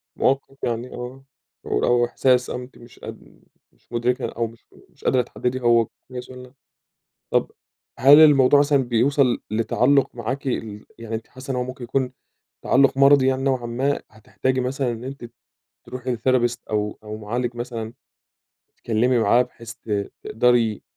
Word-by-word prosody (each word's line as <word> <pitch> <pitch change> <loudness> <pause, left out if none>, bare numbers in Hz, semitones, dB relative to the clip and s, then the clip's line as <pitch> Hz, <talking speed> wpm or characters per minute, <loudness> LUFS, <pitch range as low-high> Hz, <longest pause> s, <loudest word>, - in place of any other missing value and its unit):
موقف 135 0 0
يعني 120 +1 -2
آه، 125 +2 -8 0.4
شعور - - 0
أو 120 0 +3
إحساس 125 +1 +1
أو - - -3
أنتِ 125 +1 -10
مش 120 0 -16
قد - - -12 0.3
مش - - -36
مدركة 120 +1 0
أو 115 0 -2
مش 115 +1 -17 0.2
مش - - -23
قادرة 130 -1 +3
تحددي 125 +1 -3
هو 115 -2 +4 0.2
كويس 125 -1 -8
والّا 125 0 -12 0.8
طب - - +1 0.5
هل 140 +4 +8
الموضوع 145 -2 +6
مثلًا 145 0 +3
بيوصل 125 +2 +2
لتعلق 125 +5 +2
معاكِ 125 +4 -4
ال 110 -4 -4
يعني 115 -1 -6
أنتِ 110 0 -5
حاسة 130 +1 -11
إن 130 - -1
هو 125 - -1
ممكن 130 0 -8
يكون 130 +1 -1 0.5
تعلق 135 0 +3
مَرَضي 140 -1 +6
يعني 130 0 +1
نوعًا 130 -3 0
ما 130 +4 -1
هتحتاجي 130 +4 -2
مثلًا 130 0 -1
إن 115 +1 -8
أنتِ 135 -1 -8 0.6
تروحي 125 -1 -4
لTherapist 120 0 +1
أو 105 -1 -2
أو 105 0 -7
مُعالج 120 +3 -3
مثلًا 115 -2 -5 0.8
تتكلمي 120 +2 +1
معاه 115 +2 +4
بحيث 115 -2 -10
ت 100 -2 -4
تقدري 115 -2 +1
125 Hz, 155 wpm, -22 LUFS, 115-130 Hz, 0.8 s, هل